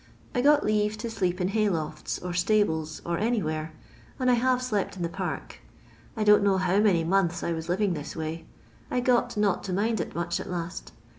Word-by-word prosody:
I 245 - +1
got 290 +2 +4
leave 210 0 +1
to 235 +1 -5
sleep 185 -5 -1
in 180 0 0
hay 215 0 +2
lofts, 155 -4 -3
or 180 -1 -5
stables, 175 -4 +1
or 170 0 -1
anywhere, 160 -9 -1 0.5
and 255 -1 +3
I - - +5
have 250 +1 +2
slept 215 -6 -2
in 175 - -3
the 170 - -1
park. - - -5 0.6
I 215 - +1
don't 210 0 +6
know 200 -1 +3
how 190 +1 +2
many 195 -6 +3
months 175 0 +1
I 170 - 0
was 160 +1 -5
living 190 +1 +1
this 150 -2 -6
way. 160 +1 -5 0.4
I 250 - 0
got 245 -2 +1
not 205 -3 +1
to 190 - -3
mind 220 +3 +1
it - - -6
much 170 0 -1
at - - -7
last. 175 0 -5
190 Hz, 210 wpm, -27 LUFS, 170-215 Hz, 0.6 s, don't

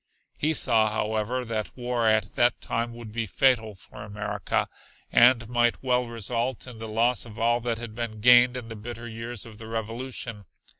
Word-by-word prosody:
He 155 +2 +1
saw, 115 -5 +4
however, 110 +3 -1
that 110 0 -4
war 120 -2 0
at 110 -2 +2
that 120 -1 +2
time 115 0 -3
would 115 -2 -9
be 115 0 -3
fatal 110 -2 +2
for 95 - -13
America, 105 -2 -2 0.4
and 120 -1 +5
might 120 +1 +1
well 125 -1 +1
result 115 +2 -3
in 125 -3 -10
the 110 - -6
loss 115 +3 +1
of 110 -2 -11
all 120 +1 +2
that 115 -1 -1
had 115 -1 -7
been 115 -1 -5
gained 125 +2 +6
in 120 -3 -7
the 115 - -7
bitter 120 +2 -8
years 115 0 -6
of 110 -2 -12
the 110 - -9
Revolution. 115 -1 -5
115 Hz, 185 wpm, -26 LUFS, 110-120 Hz, 0.4 s, gained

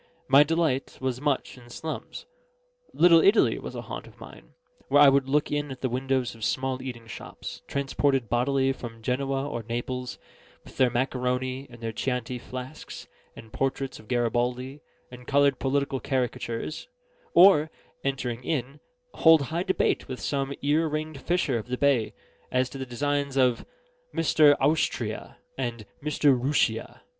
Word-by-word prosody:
My 140 -1 +7
delight 150 -3 0
was 130 -1 -2
much 145 -3 -1
in 120 -1 -16
slums. 160 +6 -6 0.7
Little 165 0 +6
Italy 200 +6 +4
was - - -7
a - - -5
haunt - - -7
of - - -18
mine; - - -13 0.3
there - - +4
I 145 -1 +9
would 135 -1 +2
look 150 +2 +1
in 145 0 -1
at 130 - -8
the 130 - 0
windows 130 0 -1
of 115 -1 -11
small 130 +2 -1
eating 120 -3 -7
shops, - - -8
transported 140 -2 0
bodily 135 +4 +1
from 115 -3 -9
Genoa 135 +3 -1
or 120 -5 -4
Naples, 120 +2 -4 0.5
with - - -15
their 130 -1 +4
macaroni, 130 +1 -1
and 115 -2 -6
chianti 125 0 -2
flasks, 130 +4 -8 0.3
and 110 - -13
portraits 135 0 -2
of 110 - -16
Garibaldi, 125 +3 -1 0.3
and 125 0 -12
coloured 140 -2 +3
political 140 0 0
caricatures; 125 +1 -3 0.5
or 170 -4 +7 0.3
(entering 130 -3 -2
in) 140 0 -3 0.3
hold 160 -3 +6
high 160 +5 -2
debate 190 - 0
with 130 -2 -6
some 135 -1 -2
ear 155 +3 +2
ringed 155 -2 -4
fisher 160 -8 0
of 110 - -8
the 125 0 -2
bay 135 -6 +2 0.4
as 130 0 +1
to 135 - -8
the 130 - -5
designs 140 +2 -1
of 125 -3 +2 0.5
"Mr. 155 -2 +5
Owstria" 150 +4 0 0.2
and 120 -4 -3 0.2
"Mr. 145 -2 +3
Rooshia." 135 +4 0
135 Hz, 150 wpm, -26 LUFS, 125-145 Hz, 0.7 s, I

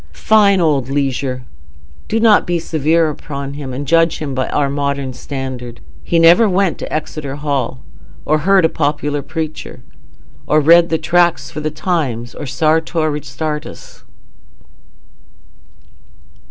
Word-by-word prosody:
Fine 200 -3 +6
old 140 -6 +1
Leisure! 135 -2 -2 0.6
Do 225 - 0
not 220 -2 +4
be 175 0 +1
severe 160 0 +1
upon 140 -1 -7
him, 140 -2 -6
and 135 +3 -5
judge 165 +1 +3
him 145 -3 -5
by 130 -1 -2
our 140 - +1
modern 140 -1 -2
standard. 130 -3 -6 0.2
He 170 - 0
never 170 +7 +6
went 190 -1 +1
to - - -6
Exeter 150 -2 -4
Hall, 140 -3 -2 0.4
or 155 +1 +2
heard 190 +2 +4
a - - +3
popular 145 -1 -1
preacher, 155 +1 -6 0.6
or 155 - +4
read 170 +3 +5
Tracts 175 0 +2
for 155 - -6
the 155 0 -2
Times 150 -8 -2
or 145 - -7
Sartor 160 +2 +1
Resartus. 150 +1 -6
150 Hz, 130 wpm, -17 LUFS, 140-165 Hz, 0.6 s, Fine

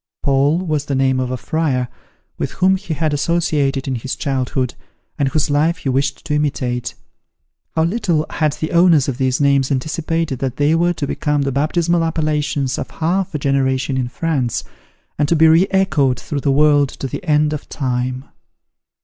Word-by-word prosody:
Paul 140 +3 +3
was 155 -3 -1
the 140 - -2
name 130 -1 +2
of 130 -1 -1
a 130 - -2
friar, 135 -3 -1 0.5
with - - -3
whom 190 +1 +3
he 185 -4 -4
had 155 -1 0
associated 145 -3 0
in 135 - -1
his 125 +2 -3
childhood, 130 -2 -1 0.5
and 140 - +2
whose 150 0 0
life 155 +4 +2
he 140 - -3
wished 135 +4 -1
to 155 - -2
imitate. 130 -5 -1 0.8
How 160 - +2
little 170 -4 0
had 155 -3 0
the 155 - -4
owners 170 -5 +4
of 135 -1 -3
these 130 0 +1
names 140 -2 +2
anticipated 155 +1 -1
that 130 -2 -3
they 145 +2 +3
were 175 +2 +2
to 155 -4 -3
become 145 0 -1
the 135 - -1
baptismal 165 +4 +1
appellations 150 -4 -1
of - - -5
half 180 +2 -1
a - - +2
generation 135 -1 0
in 130 -2 -1
France, 130 -2 -1 0.6
and 145 -1 +2
to 170 - +3
be 160 0 +5
re 165 +4 +5
echoed 150 -10 +2
through 140 +4 -4
the 140 - +1
world 145 0 +4
to - - -7
the 135 - -5
end 150 -2 +2
of 150 - -6
time! 125 -1 -2
145 Hz, 185 wpm, -18 LUFS, 135-160 Hz, 0.8 s, be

